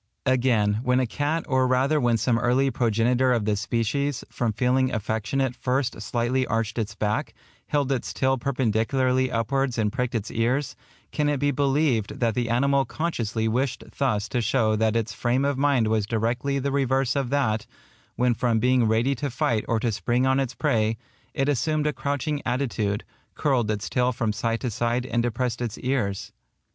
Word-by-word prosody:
Again, 120 Hz, -5 st, +2 dB
when 125 Hz, +1 st, +2 dB
a 130 Hz, -, +2 dB
cat, 145 Hz, +7 st, -2 dB
or 130 Hz, -2 st, +2 dB
rather 135 Hz, +4 st, +2 dB
when 120 Hz, -2 st, +3 dB
some 115 Hz, +1 st, +1 dB
early 125 Hz, +3 st, +2 dB
progenitor 120 Hz, +2 st, +2 dB
of 115 Hz, -4 st, +1 dB
the 105 Hz, -1 st, +1 dB
species, 120 Hz, +6 st, -1 dB
from 120 Hz, -2 st, -1 dB
feeling 130 Hz, +3 st, +1 dB
affectionate 110 Hz, +4 st, -1 dB
first 130 Hz, -1 st, -1 dB
slightly 125 Hz, +2 st, 0 dB
arched 115 Hz, 0 st, -1 dB
its 110 Hz, -2 st, -3 dB
back, 105 Hz, 0 st, -2 dB, 0.3 s
held 145 Hz, -2 st, 0 dB
its 130 Hz, -3 st, -1 dB
tail 130 Hz, -1 st, +1 dB
perpendicularly 130 Hz, +1 st, +1 dB
upwards 125 Hz, +3 st, 0 dB
and 105 Hz, -2 st, 0 dB
pricked 125 Hz, -2 st, -2 dB
its 110 Hz, -1 st, -3 dB
ears, 125 Hz, +5 st, 0 dB, 0.4 s
can 150 Hz, -1 st, 0 dB
it 145 Hz, -2 st, 0 dB
be 145 Hz, +1 st, +2 dB
believed 135 Hz, -5 st, +1 dB
that 115 Hz, -2 st, +1 dB
the 120 Hz, 0 st, -1 dB
animal 140 Hz, +3 st, +2 dB
consciously 115 Hz, -9 st, -2 dB
wished 125 Hz, +4 st, -1 dB, 0.2 s
thus 105 Hz, -7 st, +1 dB
to 125 Hz, -, 0 dB
show 110 Hz, -1 st, +2 dB
that 110 Hz, +1 st, +1 dB
its 115 Hz, -2 st, -1 dB
frame 125 Hz, +5 st, 0 dB
of 140 Hz, 0 st, +1 dB
mind 135 Hz, -5 st, +3 dB
was 110 Hz, -2 st, 0 dB
directly 120 Hz, +5 st, -1 dB
the 140 Hz, +1 st, -1 dB
reverse 135 Hz, -1 st, +1 dB
of 135 Hz, -3 st, -1 dB
that, 120 Hz, -6 st, 0 dB, 0.5 s
when 125 Hz, 0 st, +2 dB
from 115 Hz, 0 st, +1 dB
being 125 Hz, +1 st, +3 dB
ready 115 Hz, +5 st, +2 dB
to 140 Hz, +2 st, -3 dB
fight 115 Hz, -3 st, 0 dB
or 115 Hz, -, +1 dB
to 115 Hz, +1 st, 0 dB
spring 120 Hz, +4 st, 0 dB
on 130 Hz, +1 st, +3 dB
its 130 Hz, -2 st, -2 dB
prey, 110 Hz, 0 st, +1 dB, 0.4 s
it 135 Hz, -, +1 dB
assumed 150 Hz, +2 st, 0 dB
a 150 Hz, -, +1 dB
crouching 145 Hz, +1 st, -2 dB
attitude, 110 Hz, -6 st, -1 dB, 0.3 s
curled 130 Hz, -7 st, +1 dB
its 105 Hz, -1 st, -2 dB
tail 125 Hz, 0 st, +1 dB
from 110 Hz, -3 st, -1 dB
side 115 Hz, +1 st, -1 dB
to 125 Hz, -, -2 dB
side 120 Hz, +3 st, -1 dB
and 120 Hz, -2 st, 0 dB
depressed 120 Hz, +1 st, -2 dB
its 120 Hz, -4 st, -3 dB
ears? 120 Hz, -7 st, -2 dB
125 Hz, 180 wpm, -25 LUFS, 115-135 Hz, 0.5 s, when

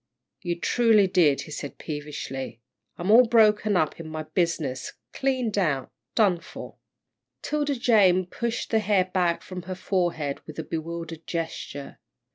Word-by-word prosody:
"You 175 Hz, -1 st, -3 dB
truly 225 Hz, -1 st, +4 dB
did," 175 Hz, -7 st, +3 dB
he 155 Hz, -, -10 dB
said, 145 Hz, -1 st, -6 dB
peevishly. 145 Hz, -5 st, -6 dB, 0.4 s
"I'm 180 Hz, +4 st, 0 dB
all 240 Hz, +2 st, +8 dB
broken 215 Hz, -3 st, +4 dB
up 155 Hz, -1 st, 0 dB
in 165 Hz, -, -7 dB
my 155 Hz, 0 st, -4 dB
business, 155 Hz, -7 st, -1 dB, 0.2 s
cleaned 255 Hz, -6 st, 0 dB
out, 140 Hz, -8 st, 0 dB, 0.2 s
done 195 Hz, -6 st, +4 dB
for." 165 Hz, -, -10 dB, 0.7 s
'Tilda 295 Hz, -1 st, 0 dB
Jane 200 Hz, -7 st, +4 dB
pushed 235 Hz, +6 st, -3 dB
the 220 Hz, -, +4 dB
hair 200 Hz, -3 st, +2 dB
back 180 Hz, -2 st, 0 dB
from 185 Hz, -1 st, -7 dB
her 185 Hz, -, -2 dB
forehead 175 Hz, -7 st, -1 dB
with 155 Hz, -, -9 dB
a 160 Hz, -, -3 dB
bewildered 165 Hz, 0 st, -6 dB
gesture. 165 Hz, -4 st, -5 dB
180 Hz, 145 wpm, -26 LUFS, 155-210 Hz, 0.7 s, all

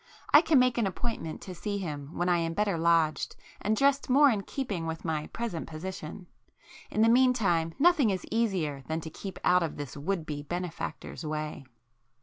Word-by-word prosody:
I 295 Hz, -, +10 dB
can 315 Hz, -3 st, +3 dB
make 250 Hz, -1 st, +4 dB
an 220 Hz, -, +2 dB
appointment 185 Hz, -4 st, -4 dB
to 185 Hz, -, -7 dB
see 205 Hz, +3 st, -3 dB
him 150 Hz, -5 st, -6 dB
when 175 Hz, -, 0 dB
I 175 Hz, -1 st, +3 dB
am 165 Hz, 0 st, -2 dB
better 205 Hz, -3 st, +1 dB
lodged, 165 Hz, -1 st, +2 dB, 0.3 s
and 215 Hz, +1 st, +1 dB
dressed 280 Hz, +2 st, +2 dB
more 280 Hz, +2 st, +6 dB
in 210 Hz, -3 st, 0 dB
keeping 195 Hz, -8 st, -4 dB
with 160 Hz, +1 st, -5 dB
my 155 Hz, -2 st, -1 dB
present 225 Hz, -9 st, -4 dB
position,—in 175 Hz, +5 st, -7 dB
the -, -, +5 dB
meantime, 225 Hz, -10 st, +3 dB
nothing 310 Hz, -6 st, +5 dB
is 185 Hz, -2 st, -2 dB
easier 185 Hz, -11 st, 0 dB
than 160 Hz, +1 st, -1 dB
to 160 Hz, -, -7 dB
keep 190 Hz, +3 st, -7 dB
out 180 Hz, 0 st, +4 dB
of 165 Hz, -3 st, -3 dB
this 145 Hz, -1 st, -6 dB
would 165 Hz, +3 st, -2 dB
be 145 Hz, -2 st, -4 dB
benefactor's 175 Hz, +1 st, -5 dB
way." 155 Hz, -2 st, -4 dB
180 Hz, 180 wpm, -29 LUFS, 160-225 Hz, 0.3 s, I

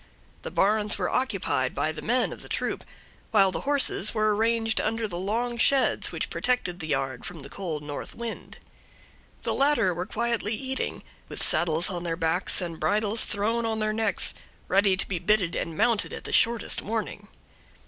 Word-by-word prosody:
The -, -, -5 dB
barns 210 Hz, +1 st, +3 dB
were 180 Hz, -3 st, -1 dB
occupied 170 Hz, -, 0 dB
by 155 Hz, -, 0 dB
the 155 Hz, -, -7 dB
men 245 Hz, +2 st, +1 dB
of -, -, -11 dB
the -, -, -11 dB
troop, -, -, -2 dB, 0.5 s
while 195 Hz, -4 st, +4 dB
the -, -, -3 dB
horses 270 Hz, -7 st, +2 dB
were 215 Hz, -1 st, +2 dB
arranged 225 Hz, 0 st, +2 dB
under 225 Hz, +1 st, -1 dB
the 175 Hz, -3 st, -5 dB
long 235 Hz, +5 st, -1 dB
sheds 275 Hz, +2 st, +3 dB
which -, -, -3 dB
protected 245 Hz, -8 st, 0 dB
the 160 Hz, -, -5 dB
yard 135 Hz, -3 st, -2 dB
from 170 Hz, -4 st, -7 dB
the 140 Hz, +1 st, -10 dB
cold 160 Hz, -5 st, -4 dB
north 145 Hz, -1 st, -6 dB
wind. 235 Hz, -1 st, -7 dB, 0.9 s
The -, -, +1 dB
latter 275 Hz, -10 st, +3 dB
were 180 Hz, +2 st, -4 dB
quietly 230 Hz, -1 st, -1 dB
eating, 265 Hz, +2 st, -4 dB, 0.3 s
with -, -, -3 dB
saddles 170 Hz, +2 st, +3 dB
on 175 Hz, -1 st, -4 dB
their 165 Hz, -1 st, -2 dB
backs 165 Hz, +4 st, +1 dB
and 170 Hz, -2 st, -5 dB
bridles 215 Hz, +1 st, +1 dB
thrown 225 Hz, +3 st, 0 dB
on 225 Hz, -1 st, -1 dB
their 215 Hz, 0 st, 0 dB
necks, 220 Hz, -2 st, +1 dB, 0.3 s
ready 195 Hz, 0 st, +3 dB
to -, -, 0 dB
be 185 Hz, -3 st, -2 dB
bitted 185 Hz, -1 st, +2 dB
and 165 Hz, -1 st, -3 dB
mounted 230 Hz, -4 st, +2 dB
at -, -, -7 dB
the -, -, -6 dB
shortest 230 Hz, -2 st, +3 dB
warning. 210 Hz, -1 st, -4 dB
205 Hz, 180 wpm, -26 LUFS, 175-225 Hz, 0.9 s, while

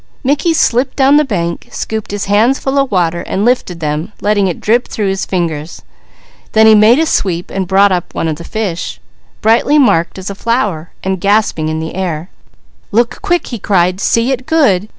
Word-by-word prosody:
Mickey 285 Hz, +5 st, +1 dB
slipped 250 Hz, -2 st, +1 dB
down 275 Hz, +1 st, +4 dB
the 300 Hz, -, +4 dB
bank, 170 Hz, -, -3 dB
scooped 220 Hz, -1 st, -4 dB
his 205 Hz, 0 st, -3 dB
hands 220 Hz, +7 st, +3 dB
full 275 Hz, +1 st, -1 dB
of 275 Hz, -1 st, +1 dB
water, 170 Hz, -3 st, 0 dB
and 195 Hz, +3 st, -2 dB
lifted 235 Hz, -9 st, 0 dB
them, 155 Hz, +6 st, -3 dB
letting 205 Hz, -1 st, +1 dB
it 175 Hz, -, -3 dB
drip 235 Hz, +3 st, +1 dB
through 205 Hz, -3 st, -2 dB
his 195 Hz, 0 st, -2 dB
fingers. 165 Hz, -4 st, -3 dB, 0.7 s
Then 220 Hz, 0 st, +5 dB
he 220 Hz, -, +7 dB
made 215 Hz, +3 st, +6 dB
a 320 Hz, -, +2 dB
sweep 180 Hz, -, -1 dB
and 190 Hz, -1 st, -3 dB
brought 195 Hz, +2 st, +4 dB
up 180 Hz, -1 st, -3 dB
one -, -, -1 dB
of 155 Hz, -2 st, -2 dB
the 170 Hz, -, -9 dB
fish, 195 Hz, -4 st, -4 dB, 0.4 s
brightly 230 Hz, +7 st, +3 dB
marked 185 Hz, -, +2 dB
as 190 Hz, +1 st, -5 dB
a -, -, -5 dB
flower, 205 Hz, -7 st, -2 dB
and 190 Hz, -1 st, -2 dB
gasping 200 Hz, -6 st, +1 dB
in 155 Hz, 0 st, -2 dB
the 160 Hz, 0 st, -5 dB
air. 175 Hz, -2 st, -4 dB, 0.6 s
"Look 235 Hz, +3 st, 0 dB
quick!" 350 Hz, -4 st, 0 dB
he 235 Hz, -, -6 dB
cried. 185 Hz, -2 st, +1 dB
"See 230 Hz, +5 st, +1 dB
it 255 Hz, -1 st, -3 dB
good! 215 Hz, -, +2 dB
200 Hz, 195 wpm, -14 LUFS, 175-240 Hz, 0.7 s, he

